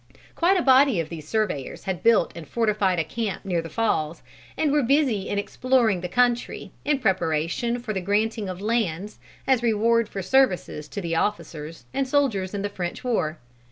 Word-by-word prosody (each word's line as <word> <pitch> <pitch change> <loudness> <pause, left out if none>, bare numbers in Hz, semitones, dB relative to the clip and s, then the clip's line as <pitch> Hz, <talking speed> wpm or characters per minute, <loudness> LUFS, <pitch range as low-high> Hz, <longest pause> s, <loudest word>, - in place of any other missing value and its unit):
Quite 365 +3 +3
a 350 - +1
body 265 -5 +5
of 160 -1 -3
these 155 -3 -8
surveyors 210 - -2
had 190 -3 -3
built 230 -6 +4
and 165 -3 -8
fortified 210 -4 +1
a 165 - +2
camp 210 +4 -4
near 175 -3 0
the 165 - -8
Falls, 170 -8 -1 0.3
and 305 -2 +1
were 295 0 +3
busy 260 -6 +1
in 205 - -1
exploring 225 -2 +1
the 180 - -4
country, 245 +2 0
in 295 -1 +2
preparation 190 - 0
for 235 -3 -4
the 190 - -2
granting 210 +2 0
of 185 0 -6
lands 210 -3 -1 0.3
as 260 -3 +3
rewards 230 0 +2
for 195 - -5
services 185 - +1
to 200 - -5
the 165 -2 -2
officers 165 -7 -3
and 275 -1 0
soldiers 230 -9 +1
in 200 - -3
the - - 0
French 180 -3 -5
war. 170 -11 0
210 Hz, 185 wpm, -24 LUFS, 175-240 Hz, 0.3 s, body